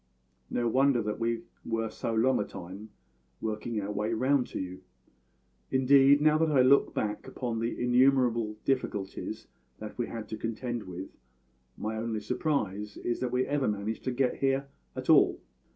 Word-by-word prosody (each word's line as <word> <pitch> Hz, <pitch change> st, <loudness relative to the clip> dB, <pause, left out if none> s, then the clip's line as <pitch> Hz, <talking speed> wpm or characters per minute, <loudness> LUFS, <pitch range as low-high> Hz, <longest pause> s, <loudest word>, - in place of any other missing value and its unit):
No 120 Hz, -1 st, 0 dB
wonder 130 Hz, +2 st, +3 dB
that 105 Hz, +1 st, -3 dB
we 115 Hz, 0 st, -1 dB, 0.2 s
were 115 Hz, -1 st, -2 dB
so 115 Hz, -, -3 dB
long 120 Hz, +3 st, +3 dB
a -, -, +1 dB
time 95 Hz, +4 st, -9 dB, 0.5 s
working 110 Hz, +1 st, -3 dB
our 100 Hz, 0 st, -3 dB
way 105 Hz, +2 st, -1 dB
round 130 Hz, +2 st, +2 dB
to -, -, -5 dB
you. 95 Hz, 0 st, -6 dB, 0.9 s
Indeed, 135 Hz, +2 st, +5 dB
now 155 Hz, 0 st, +4 dB
that 160 Hz, 0 st, +3 dB
I 135 Hz, -3 st, +5 dB
look 140 Hz, +2 st, +4 dB
back 105 Hz, -1 st, -2 dB
upon 120 Hz, -3 st, -3 dB
the 115 Hz, +1 st, -2 dB
innumerable 125 Hz, -3 st, +3 dB
difficulties 105 Hz, -7 st, -2 dB, 0.3 s
that 105 Hz, 0 st, -8 dB
we 120 Hz, -, 0 dB
had 110 Hz, -2 st, -6 dB
to 110 Hz, -, -4 dB
contend 115 Hz, 0 st, -4 dB
with, 90 Hz, +1 st, -7 dB, 0.7 s
my 110 Hz, +1 st, -3 dB
only 110 Hz, -1 st, -2 dB
surprise 105 Hz, -, -2 dB
is 120 Hz, -, -2 dB
that 125 Hz, -1 st, -2 dB
we 125 Hz, +1 st, +1 dB
ever 145 Hz, -2 st, 0 dB
managed 105 Hz, +1 st, -2 dB
to 130 Hz, -, 0 dB
get 125 Hz, 0 st, 0 dB
here 135 Hz, 0 st, 0 dB, 0.3 s
at -, -, -6 dB
all. -, -, +5 dB
115 Hz, 170 wpm, -29 LUFS, 105-130 Hz, 0.9 s, Indeed